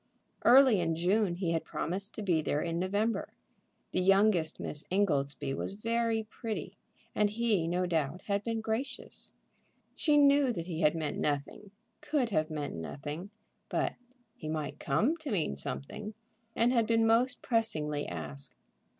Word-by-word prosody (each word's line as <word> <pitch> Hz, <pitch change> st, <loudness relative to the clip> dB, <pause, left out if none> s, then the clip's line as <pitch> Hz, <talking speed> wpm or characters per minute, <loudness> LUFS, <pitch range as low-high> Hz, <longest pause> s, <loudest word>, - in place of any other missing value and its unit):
Early 255 Hz, -3 st, +7 dB
in 165 Hz, -2 st, 0 dB
June 180 Hz, +2 st, +2 dB
he 175 Hz, -2 st, -1 dB
had 165 Hz, -1 st, 0 dB
promised 195 Hz, +5 st, -3 dB
to 215 Hz, -, -4 dB
be 175 Hz, -5 st, +2 dB
there 150 Hz, 0 st, 0 dB
in 170 Hz, 0 st, -2 dB
November. 205 Hz, +5 st, 0 dB, 0.6 s
The 185 Hz, -, +1 dB
youngest 195 Hz, -4 st, +3 dB
Miss 150 Hz, -, -1 dB
Ingoldsby 145 Hz, -8 st, 0 dB
was 140 Hz, -, -3 dB
very 230 Hz, +1 st, 0 dB
pretty, 215 Hz, -5 st, -5 dB, 0.4 s
and 210 Hz, -1 st, +2 dB
he, 210 Hz, -6 st, +1 dB
no 180 Hz, +2 st, 0 dB
doubt, 165 Hz, 0 st, -1 dB
had 200 Hz, 0 st, -1 dB
been 225 Hz, 0 st, -2 dB
gracious. 225 Hz, +5 st, -4 dB, 0.6 s
She 300 Hz, -2 st, +2 dB
knew 280 Hz, -2 st, +5 dB
that 170 Hz, -5 st, -4 dB
he 170 Hz, -2 st, -4 dB
had 150 Hz, 0 st, +4 dB
meant 155 Hz, -2 st, -2 dB
nothing, 145 Hz, +7 st, -2 dB, 0.3 s
could 270 Hz, -7 st, 0 dB
have 155 Hz, -3 st, +1 dB
meant 150 Hz, -2 st, -4 dB
nothing. 145 Hz, -, -6 dB, 0.4 s
But -, -, 0 dB, 0.4 s
he 155 Hz, -, -7 dB
might 150 Hz, -1 st, -3 dB
come 215 Hz, -, +1 dB
to 315 Hz, -3 st, -6 dB
mean 170 Hz, -, 0 dB
something, 70 Hz, -, -4 dB, 0.4 s
and 240 Hz, +2 st, +3 dB
had 230 Hz, -3 st, +3 dB
been 225 Hz, -1 st, +3 dB
most 240 Hz, +3 st, +3 dB
pressingly 155 Hz, -, 0 dB
asked. 75 Hz, -5 st, -4 dB
185 Hz, 155 wpm, -31 LUFS, 155-225 Hz, 0.6 s, Early